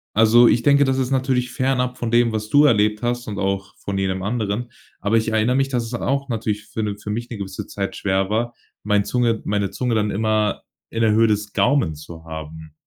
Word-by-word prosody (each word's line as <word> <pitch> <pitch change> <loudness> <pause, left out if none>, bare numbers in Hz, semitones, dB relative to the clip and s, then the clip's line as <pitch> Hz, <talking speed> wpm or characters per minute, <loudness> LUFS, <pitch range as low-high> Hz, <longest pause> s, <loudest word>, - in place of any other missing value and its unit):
Also, 115 +2 +6
ich 120 - +3
denke, 140 +2 +5
das 135 -1 +1
ist 130 0 -1
natürlich 130 -2 0
fernab 125 0 0
von 120 -2 -3
dem, 120 -1 +3
was 105 -1 -3
du 145 +4 +5
erlebt 105 -4 +3
hast, 120 0 -2
und 100 - -5
auch 100 0 -2
von 100 -1 -4
jedem 95 -1 -1
anderen. 110 +2 -2 0.3
Aber 105 +3 0
ich 110 0 +2
erinnere 110 +3 +2
mich, 135 0 +1
dass 125 -3 -1
es 115 - -8
auch 140 +3 -1
natürlich 110 -3 -3
für 110 - -4
'ne 105 -1 -3
für 105 - -8
mich 120 +3 -4
'ne 115 - -6
gewisse 95 +1 -6
Zeit 100 0 -4
schwer 95 -1 0
war, 120 +3 -1 0.3
mein 105 -1 +2
Zunge 120 -3 0
meine 100 -1 0
Zunge 120 +3 -1
dann 105 -1 +1
immer 110 0 0 0.3
in 115 - -3
der 110 -1 +4
Höhe 115 +1 +4
des 105 -1 -1
Gaumen 115 - +2
zu 80 +2 -11
haben. 80 -1 -9
110 Hz, 225 wpm, -21 LUFS, 100-120 Hz, 0.3 s, Also